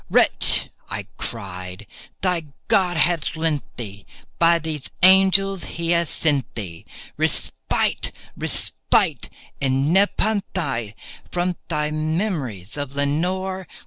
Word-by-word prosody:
"Wretch," - - +5 0.2
I - - -4
cried, 95 -2 -6 0.4
"thy 180 -4 0 0.2
God 190 -6 +3
hath 165 +1 +2
lent 160 -3 0
thee—by 120 +10 -1
these 155 -4 -4
angels 190 0 +5
he 170 0 -3
hath 170 -2 +2
sent 145 -6 0
thee 85 -7 -7 0.3
Respite—respite - - 0 0.3
and 135 +4 +2
nepenthé 190 - 0 0.4
from 180 0 0
thy 150 -2 -1
memories 155 - -2
of 140 -1 -5
Lenore! 180 +6 -1
160 Hz, 95 wpm, -22 LUFS, 130-180 Hz, 0.4 s, Wretch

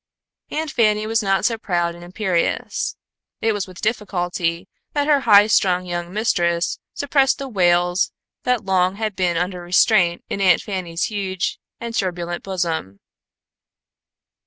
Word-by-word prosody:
Aunt 310 -1 -3
Fanny 215 -2 +2
was 225 +1 +1
not 195 -1 +1
so 230 -2 +1
proud 175 -5 0
and 175 0 -12
imperious. 180 -1 -1 0.4
It 225 - +1
was 205 -2 -2
with 185 -1 -12
difficulty 180 -6 -1 0.3
that 290 0 0
her 295 -2 +5
high 205 0 +8
strung 185 -4 +2
young 175 -1 -4
mistress 175 -5 0 0.2
suppressed 275 -2 +2
the 275 - -5
wails 175 -4 +2 0.3
that 250 -4 0
long 185 -1 +2
had 215 -1 -3
been 180 -3 0
under 180 +1 -2
restraint 175 0 +3
in 200 - -3
Aunt 180 -3 +4
Fanny's 180 -4 -3
huge 195 -3 -2 0.2
and 235 0 -5
turbulent 175 -4 -2
bosom. 165 - -3
185 Hz, 140 wpm, -21 LUFS, 175-215 Hz, 0.4 s, high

